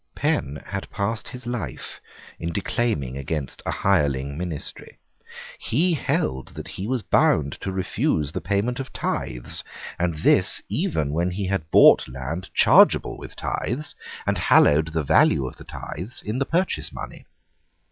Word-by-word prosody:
Penn 70 - 0
had 95 0 -5
passed 110 +3 -2
his 125 -1 -9
life 110 - -5 0.4
in 85 0 -3
declaiming 100 - -1
against 70 0 -4
a - - +1
hireling 70 -7 +1
ministry. 85 -2 -6 0.6
He 170 +10 +1
held 65 - -1
that - - -7
he 95 - -5
was 125 -2 -1
bound 70 -2 +3
to 95 - -3
refuse 85 -5 0
the 95 - -4
payment 100 +8 0
of 135 - -5
tithes, - - -3 0.4
and 85 -2 0
this 75 - +3
even 75 -3 -1
when 85 +3 +1
he 95 +2 -3
had 95 -5 -2
bought - - +7
land 70 +9 -5
chargeable - - +5
with - - -10
tithes, 145 +6 -3 0.3
and - - 0
hallowed 75 +2 +5
the 80 -1 -1
value 70 -1 +4
of 65 - -7
the - - -12
tithes 95 +10 -7
in 110 +5 -2
the 135 - 0
purchase 180 +3 0
money. - - -9
90 Hz, 150 wpm, -24 LUFS, 75-110 Hz, 0.6 s, bought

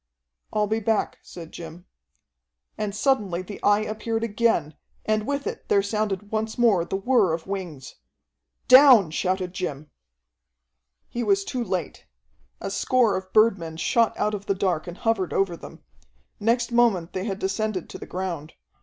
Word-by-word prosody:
"I'll 210 -1 +1
be 220 +2 -1
back," 220 0 -1
said 165 -2 -11
Jim. 170 +1 -10 0.9
And 205 -1 -3
suddenly 210 -8 +1
the 205 +2 -9
Eye 205 +1 +4
appeared 225 +1 -3
again, 215 -9 +1 0.3
and 215 0 0
with 280 0 -2
it - - -6
there 200 -1 +4
sounded 205 -1 -2
once 220 0 -2
more 220 -8 +4
the 185 - -4
whir 195 -3 +2
of 160 0 -4
wings. 180 -9 -6 0.7
"Down!" 255 - +8
shouted 185 +2 -1
Jim. 150 -5 -5 1.2
He 240 - -4
was 395 +7 +2
too 255 -10 -2
late. 185 -7 -4 0.5
A - - -5
score 240 +1 +2
of 190 0 -5
birdmen 190 -8 +2
shot 230 +6 +1
out 210 0 0
of 205 0 -5
the 195 - +1
dark 180 -4 -1
and 175 +1 -7
hovered 225 -6 0
over 195 -3 +1
them. - - -12 0.6
Next 235 +3 +1
moment 230 -8 +2
they 185 +1 -3
had 195 -3 -3
descended 195 -1 -2
to - - -8
the - - -9
ground. 175 -5 -5
200 Hz, 160 wpm, -24 LUFS, 180-225 Hz, 1.2 s, Down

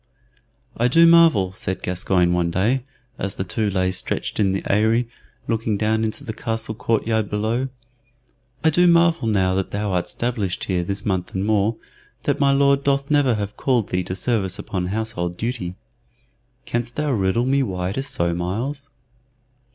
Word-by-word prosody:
"I 120 - +2
do 165 +7 +6
marvel," 165 - +5
said 95 0 -4
Gascoyne 90 -1 +1
one 85 -1 +1
day, 110 +9 +1 0.4
as 100 +1 -3
the - - -2
two 105 +3 -1
lay 95 -1 0
stretched 90 - -2
in 100 -2 +3
the 95 - -2
Eyry, 110 +4 +2 0.4
looking 110 -2 0
down 110 +1 +1
into 110 -1 -3
the 110 - -5
castle 115 -3 -3
court 115 0 -1
yard 110 -2 0
below 110 +5 -1 0.9
"I 160 - +4
do 175 +3 +4
marvel, 170 -6 +4
now 95 -4 +2
that 95 0 -1
thou 105 0 -2
art 90 -1 0
'stablished 110 -6 -2
here 90 -2 0
this 100 +3 -4
month 95 -3 -2
and 95 +1 -1
more, 110 +1 +2 0.5
that - - 0
my 140 -1 +4
Lord 140 0 +3
doth 140 0 0
never 140 -5 +3
have 100 -2 -2
thee - - -28
called 125 -6 +1
to 90 0 -2
service 100 -3 0
upon 95 -4 -3
household 95 -4 -3
duty. 115 -7 -3 0.9
Canst 120 0 -3
thou 150 -1 0
riddle 105 +1 +1
me 135 +2 +2
why 90 -6 -2
it 100 - -6
is 135 - 0
so, 85 -11 0
Myles?" 120 +12 -3
110 Hz, 175 wpm, -22 LUFS, 95-125 Hz, 0.9 s, do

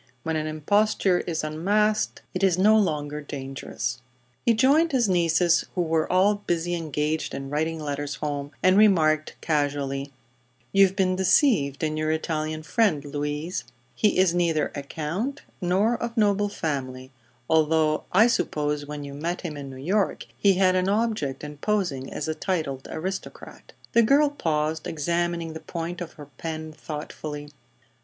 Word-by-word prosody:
When 160 0 -1
an 155 0 -1
imposture 190 +4 +2
is 160 -3 -2
unmasked 205 +8 0
it 185 - -2
is 190 -3 +3
no 210 +4 +5
longer 150 -7 0
dangerous. 135 -3 -5 0.4
He 235 - +3
joined 290 +7 +4
his 245 -4 +3
nieces, 170 -1 +3
who 180 - +1
were 160 -1 0
all 195 +3 +4
busily 175 0 0
engaged 155 -2 -2
in 135 0 -6
writing 160 +2 -1
letters 145 -1 -3
home, 145 -1 -3
and 185 +2 +5
remarked, 155 -7 +4
casually: 140 -2 -1 0.6
"You've 195 -1 +5
been 185 -2 +2
deceived 185 - +3
in 155 0 0
your 155 0 0
Italian 155 0 -2
friend, 165 -7 +1
Louise. 150 +4 -3 0.3
He 210 -3 +2
is 185 -2 +4
neither 170 -3 +1
a 145 - -4
count 170 - -4 0.2
nor 195 +6 +1
of 235 0 -4
noble 205 -1 +3
family, 130 -7 -4 0.4
although 155 -1 +2
I 210 +5 +6
suppose 150 - 0
when 150 0 -6
you 140 0 -7
met 165 +5 -3
him 165 -5 -5
in 140 -1 -7
New 130 - -9
York 190 +9 0
he 200 -2 +3
had 185 0 +3
an 185 +1 +1
object 210 - -1
in 150 0 -7
posing 165 -9 -1
as - - -4
a 160 - 0
titled 155 -6 -3
aristocrat." 190 +4 -6 0.2
The 235 - +6
girl 280 +5 +4
paused, 155 - -1
examining 170 +1 -1
the 160 - -6
point 170 +2 -5
of 170 - -6
her 150 - -11
pen 160 -1 -5
thoughtfully. 150 -1 -7
160 Hz, 155 wpm, -25 LUFS, 150-190 Hz, 0.6 s, I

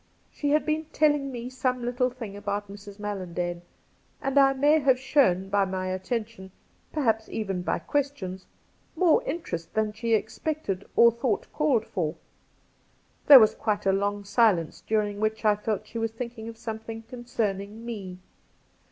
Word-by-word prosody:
She 290 - -2
had 300 +1 +3
been 310 +1 0
telling 295 -3 +1
me 240 -1 -5
some 255 -1 -1
little 250 +1 +1
thing 235 -5 -8
about 205 0 -4
Mrs. 200 0 -11
Mallandane, 180 -4 -4 0.6
and 270 -1 -2
I 270 0 +6
may 290 +4 +4
have 270 -3 +3
shown 260 -9 +2
by 200 +1 +2
my 185 -1 -2
attention 190 +1 -4 0.2
— - - -38
perhaps 225 -7 0
even 195 -4 -3
by - - -1
questions 190 -6 -3 0.2
— - - -38
more 350 +6 +4
interest 170 - -5
than 215 -1 +1
she 225 +1 +1
expected 220 -2 -3
or 235 0 +7
thought 235 -2 -2
called 280 -8 +2
for. 165 -5 -2 1.1
There 280 -3 +12
was 215 -2 +5
quite 210 -2 -2
a 195 - +4
long 205 +1 -1
silence, 200 -5 +2
during 210 -2 0
which 215 +1 -1
I 210 -1 +5
felt 210 -1 -2
that - - -24
she 230 - -5
was 225 0 0
thinking 230 0 -7
of 225 - -10
something 225 0 -6
con 240 +1 -10
cerning 210 -2 -3
me. 200 -6 -6
220 Hz, 170 wpm, -27 LUFS, 200-255 Hz, 1.1 s, There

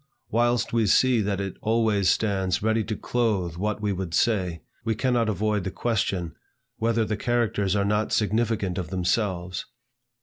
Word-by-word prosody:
Whilst 120 +1 +1
we 115 -2 +2
see 125 +3 +4
that 100 -1 -1
it 100 -1 -4
always 110 -4 +2
stands 95 -3 +1
ready 110 0 +2
to 110 +1 -3
clothe 105 -9 -1
what 105 +3 -2
we 105 -1 +1
would 90 -3 -3
say, 90 -8 +1 0.2
we 110 -1 0
cannot 120 -1 +1
avoid 105 0 0
the 95 - -2
question, 95 -6 -1 0.4
whether 115 0 +1
the 110 - -1
characters 105 -4 0
are 100 -1 +1
not 105 +1 0
significant 105 -3 0
of 85 -4 -4
themselves. 90 -1 -1
105 Hz, 160 wpm, -25 LUFS, 95-115 Hz, 0.4 s, see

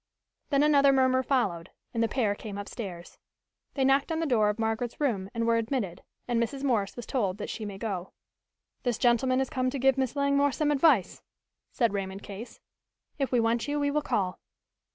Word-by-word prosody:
Then 280 -1 +3
another 280 -2 +5
murmur 260 -1 +3
followed 200 -11 0 0.2
and 230 - 0
the 230 - +3
pair 225 -4 +1
came 205 -1 -7
upstairs. 195 -4 -7 0.6
They 270 -2 +2
knocked 275 +3 +3
on 320 - -1
the 330 - 0
door 220 -7 +3
of 210 - -2
Margaret's 225 +1 -2
room 215 -10 0
and 230 -1 -2
were 230 0 +3
admitted, 225 -6 -2 0.3
and 240 -1 +1
Mrs. 265 +4 -3
Morse 225 -8 0
was 240 - -7
told 200 -8 -1
that 210 - -5
she 220 - -5
might 195 -2 -7
go. 190 -5 -3 0.7
"This 245 -3 -1
gentleman 255 +1 +3
has 265 -1 0
come 255 0 0
to 275 - -4
give 270 0 +3
Miss 260 0 -1
Langmore 280 0 +2
some 300 -1 +1
advice," 280 - +3 0.5
said 230 -5 +1
Raymond 195 0 -4
Case. 205 +4 -9 0.6
"If 275 - 0
we 250 - +3
want 230 +2 +1
you 290 0 -1
we 285 0 +1
will 300 +1 +1
call." 190 -9 -1
240 Hz, 195 wpm, -28 LUFS, 210-270 Hz, 0.7 s, another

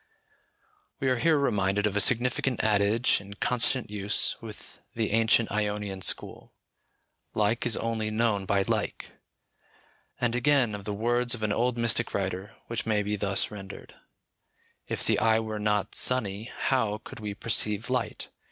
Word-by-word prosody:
We 135 - 0
are 130 - +1
here 160 +4 +3
reminded 105 -6 +1
of 105 -1 -1
a - - +2
significant 125 +3 +2
adage 105 +3 +2
in 100 +1 -11
constant 125 +1 +1
use 105 0 +1
with 110 -2 -10 0.2
the 110 -3 -1
ancient 115 +1 +3
Ionian 105 -2 -2
school - - -3 0.8
"Like 110 +3 +1
is 115 - +3
only 115 -1 -2
known 110 -3 0
by 100 0 +2
Like;" - - -2 1.1
and 120 -1 0
again, 125 -2 +2
of 100 -1 -7
the 105 - -3
words 120 +3 +1
of 110 - -8
an 105 -1 +1
old 120 +1 0
mystic 115 0 +2
writer, 95 0 -3
which 115 -1 -4
may 105 -2 +1
be 105 +1 -2
thus 100 -1 0
rendered, 95 -2 -10 0.9
"If - - -3
the - - +2
eye 110 0 +3
were 110 -1 -4
not 105 -1 0
sunny, 110 -4 +2
how 110 -6 0
could 130 - -10
we 105 -2 -5
perceive 105 0 +1
light? 120 -5 -2
110 Hz, 155 wpm, -27 LUFS, 105-120 Hz, 1.1 s, here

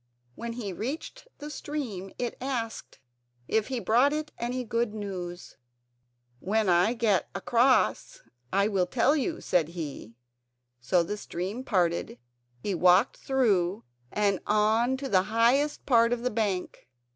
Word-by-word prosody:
When 230 - -6
he 215 -5 -5
reached 305 - -6
the 295 +1 -7
stream 240 -12 -5
it 245 -1 -3
asked 245 -4 -4 0.5
if 220 -1 +1
he 260 -2 -2
brought 245 +5 +3
it 305 0 -3
any 250 +2 -2
good 230 -2 -1
news. 180 -4 -6 0.8
"When 210 +3 +1
I 180 +7 +3
get 215 -6 +1
across 240 - +2 0.3
I 200 +2 +3
will 190 -4 +1
tell 255 +8 +2
you," 315 +3 -2
said 175 -4 +1
he. 150 -9 -7 0.6
So 170 +9 +2
the 205 +5 -4
stream 200 +6 -5
parted; 175 - 0 0.5
he 205 - -1
walked 180 +6 +4
through 210 -8 +1 0.3
and 200 -2 +1
on 220 +5 +2
to 270 0 -5
the 190 -7 +4
highest 245 +7 +2
part 230 -3 +4
of 240 -1 -3
the 250 - 0
bank. 200 - -2
220 Hz, 140 wpm, -28 LUFS, 185-250 Hz, 0.8 s, walked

